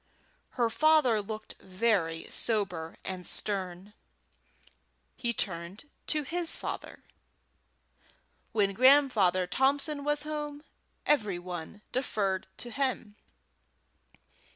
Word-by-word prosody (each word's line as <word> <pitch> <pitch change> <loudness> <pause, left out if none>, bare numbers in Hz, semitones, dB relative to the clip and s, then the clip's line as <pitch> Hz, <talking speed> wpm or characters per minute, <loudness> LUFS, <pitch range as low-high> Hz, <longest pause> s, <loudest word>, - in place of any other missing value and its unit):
Her 235 -2 +2
father 305 -7 +4
looked 215 +1 -6
very 185 -5 0
sober 180 -8 -1
and 185 -1 -5
stern. 190 -1 -3 1.2
He 240 -2 +1
turned 180 +3 -3 0.2
to 305 -1 +1
his 340 +3 -2
father. - - -6 1.5
When 200 -3 +2
Grandfather 240 -8 +5
Thompson 280 - +2
was 295 0 0
at - - -5
home, 295 -1 -4 0.4
every 210 -11 +2
one 175 +3 -7
deferred 200 -8 -1
to 240 - -6
him. 255 -6 -1
220 Hz, 95 wpm, -30 LUFS, 185-280 Hz, 1.5 s, Grandfather